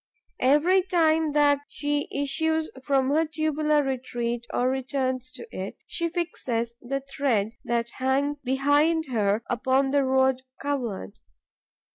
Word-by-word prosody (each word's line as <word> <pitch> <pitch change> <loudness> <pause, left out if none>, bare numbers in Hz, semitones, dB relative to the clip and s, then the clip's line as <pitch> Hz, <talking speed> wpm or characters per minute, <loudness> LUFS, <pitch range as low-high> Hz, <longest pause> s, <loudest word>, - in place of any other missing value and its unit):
Every 300 +9 +4
time 320 -4 +2
that 290 -1 +4
she 290 -1 -2
issues 315 +3 0
from 270 -1 +2
her 315 +3 +3
tubular 305 -1 +1
retreat 240 -3 -3
or 250 - +1
returns 260 -1 -1
to - - -8
it, - - -5
she 335 -1 -2
fixes 255 -9 -2
the 275 +2 -3
thread 240 -7 0
that 235 0 -1
hangs 280 +2 0
behind 290 +5 +2
her 210 -1 +1
upon 260 +2 +1
the 285 0 +3
road 265 0 +2 0.2
covered. 240 - -3
275 Hz, 125 wpm, -26 LUFS, 255-300 Hz, 0.2 s, Every